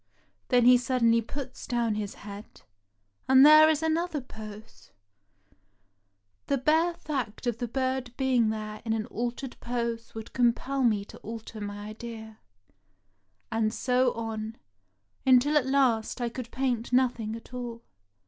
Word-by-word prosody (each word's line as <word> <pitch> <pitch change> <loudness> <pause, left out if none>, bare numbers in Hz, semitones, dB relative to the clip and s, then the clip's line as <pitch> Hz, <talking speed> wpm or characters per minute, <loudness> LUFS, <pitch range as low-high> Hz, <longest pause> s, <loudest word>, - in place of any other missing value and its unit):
Then 245 -1 +4
he 250 0 +7
suddenly 235 -2 +2
puts 260 +3 -7
down 235 -2 0
his 210 -1 -4
head, 205 +1 -11 0.7
and 265 +1 +8
there 310 +1 +9
is 315 0 +1
an 320 0 +2
other 340 -3 -2
pose. 220 - -11 1.6
The 280 - +2
bare 320 +6 +2
fact 260 -9 -4
of 235 -2 -1
the 240 - -2
bird 260 0 -2
being 255 -4 +2
there 215 -1 -5
in 225 -1 -1
an 220 -1 -1
altered 245 +2 -4
pose 235 -1 -3
would 220 0 -8
compel 255 +2 +1
me 215 -5 +2
to - - -13
alter 220 -1 -8
my 205 0 -6
idea; 220 -1 -9 1.1
and 220 -1 +1
so 250 +1 +2
on, 225 -1 -5 0.7
until 265 +3 +4
at 280 -4 +3
last 260 -5 +2
I 240 -1 -1
could 235 0 -7
paint 245 -3 -2
nothing 245 -4 +1
at 230 +2 -12
all." 240 -2 -6
240 Hz, 145 wpm, -28 LUFS, 220-260 Hz, 1.6 s, there